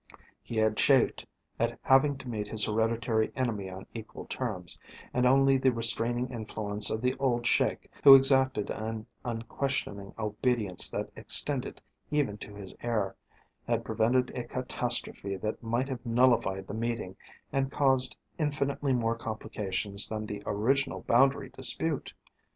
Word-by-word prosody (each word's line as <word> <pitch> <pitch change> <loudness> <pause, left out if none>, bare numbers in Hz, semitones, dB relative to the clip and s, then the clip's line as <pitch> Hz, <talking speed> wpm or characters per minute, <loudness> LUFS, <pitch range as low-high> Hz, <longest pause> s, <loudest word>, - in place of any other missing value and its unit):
He 115 - -6
had 110 -1 +2
chafed 135 -4 +3 0.3
at 115 +1 0
having 135 +1 +4
to 130 - -10
meet 105 -3 -3
his 105 0 +3
hereditary 110 +1 0
enemy 110 -7 -2
on 95 +1 -9
equal 110 -2 -8
terms, - - -3 0.3
and 125 0 +3
only 135 +1 +4
the 130 0 +3
restraining 120 +1 +2
influence 105 -3 -1
of 110 - -2
the 125 0 +2
old 120 -3 0
Sheik, - - +1 0.2
who 140 -1 +12
exacted 130 -5 +3
an 110 0 -4 0.2
unquestioning 115 -3 -3
obedience 105 -2 +1
that - - -4
extended - - 0 0.3
even 140 -9 0
to 105 - -9
his 100 -2 -9
heir, 110 -5 -1 0.5
had - - 0
prevented 125 +3 +1
a 125 - -3
catastrophe 120 -5 -2
that 105 +3 -4
might 120 +3 -1
have 130 -3 -5
nullified 115 -5 +2
the - - -8
meeting 115 -4 -3 0.4
and 135 0 0
caused 130 -2 +2 0.2
infinitely 140 -2 0
more 115 -2 +1
complications 105 -2 -2
than 110 -1 -4
the 105 -1 -6
original 135 +7 0
boundary 135 +2 +3
dispute. 140 +3 0
115 Hz, 140 wpm, -29 LUFS, 110-130 Hz, 0.5 s, who